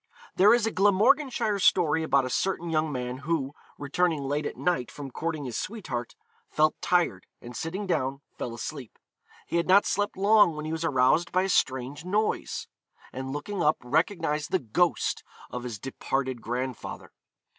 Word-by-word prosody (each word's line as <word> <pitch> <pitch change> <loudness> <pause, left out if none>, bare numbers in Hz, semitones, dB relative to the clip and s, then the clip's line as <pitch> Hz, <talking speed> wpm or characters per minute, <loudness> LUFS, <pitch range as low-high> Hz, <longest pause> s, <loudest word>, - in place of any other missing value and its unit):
There 200 +3 +6
is 235 -1 +4
a 225 - 0
Glamorganshire 210 +3 +3
story 165 -4 +3
about 140 -4 +2
a - - -3
certain 175 -1 -1
young 155 -1 +1
man 125 -1 -4
who, 145 -2 -2 0.2
returning 155 +1 0
late 145 +2 -1
at - - -7
night 170 -9 0
from 140 -2 -8
courting 155 0 -3
his 120 -3 -4
sweetheart, 135 - -5 0.3
felt 155 0 +3
tired, 175 -2 +1
and 120 0 -10
sitting 185 - -4
down 140 -6 -1
fell 120 -1 -5
asleep. 130 0 -7 0.5
He - - -1
had 170 - 0
not 195 +2 +6
slept 205 0 -1
long 205 -3 +5
when 150 0 -5
he 155 - -3
was 160 0 -3
aroused 145 +2 +3
by 185 +1 +2
a 195 - -1
strange 130 -1 0
noise, 210 +4 -1 0.5
and 130 +1 -5
looking 175 +7 -4
up 155 -1 +3
recognised 155 - 0
the - - +2
ghost 160 +9 0 0.3
of 125 - -4
his 120 -3 -5
departed 130 +1 -3
grandfather. 125 +2 -5
155 Hz, 165 wpm, -27 LUFS, 130-185 Hz, 0.5 s, There